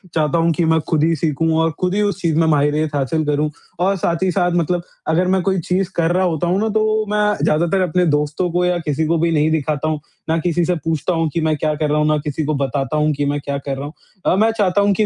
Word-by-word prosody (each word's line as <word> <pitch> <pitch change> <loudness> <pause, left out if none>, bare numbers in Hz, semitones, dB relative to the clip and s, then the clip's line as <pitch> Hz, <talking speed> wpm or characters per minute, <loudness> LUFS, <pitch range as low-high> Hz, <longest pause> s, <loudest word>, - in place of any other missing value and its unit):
चाहता 155 +1 +1
हूँ 165 0 +2
कि 170 +2 0
मैं 160 0 +3
खुद 155 -2 +2
ही 165 +1 +2
सीखूँ 160 +1 0
और 165 - +1
खुद 180 +1 0
ही 210 - +1
उस 205 -2 -1
चीज़ 165 -3 +1
में 165 - +3
माहिरियत 150 0 +1
हासिल 145 +3 0
करूँ। 150 +1 0 0.3
और 190 +3 +2
साथ 170 0 -1
ही 185 - +2
साथ, 175 0 +1
मतलब 175 0 0 0.2
अगर 175 +3 +2
मैं 190 0 +2
कोई 190 +1 0
चीज़ 180 +2 -1
कर 170 0 +1
रहा 185 +1 +2
होता 170 -1 -1
हूँ 180 +3 +1
ना, 220 - 0
तो 215 0 +1
मैं 210 0 +1
ज़्यादातर 170 +5 +2
अपने 180 0 +1
दोस्तों 150 +3 0
को 180 +1 +1
या 180 0 +1
किसी 155 -1 -1
को 165 +1 +2
भी 165 +1 +1
नहीं 155 0 +2
दिखाता 155 -1 -1
हूँ, 155 -1 -1 0.3
ना 160 - +2
किसी 175 +1 0
से 180 - +1
पूछता 160 +1 -2
हूँ 165 -1 0
कि 165 - 0
मैं 155 -1 +1
क्या 155 +1 0
कर 150 0 -1
रहा 150 - +1
हूँ, 150 - +2
ना 155 0 +2
किसी 150 +1 -3
को 155 - 0
बताता 140 +1 -1
हूँ 150 0 +2
कि 145 +1 -1
मैं 145 +1 -1
क्या 140 0 -3
कर 140 0 -4
रहा 140 - -5
हूँ। 150 - -8 0.3
अ, - - +3
मैं 220 +3 +3
चाहता 200 -1 +2
हूँ 200 0 +3
कि 215 +2 +1
165 Hz, 280 wpm, -19 LUFS, 150-180 Hz, 0.3 s, मैं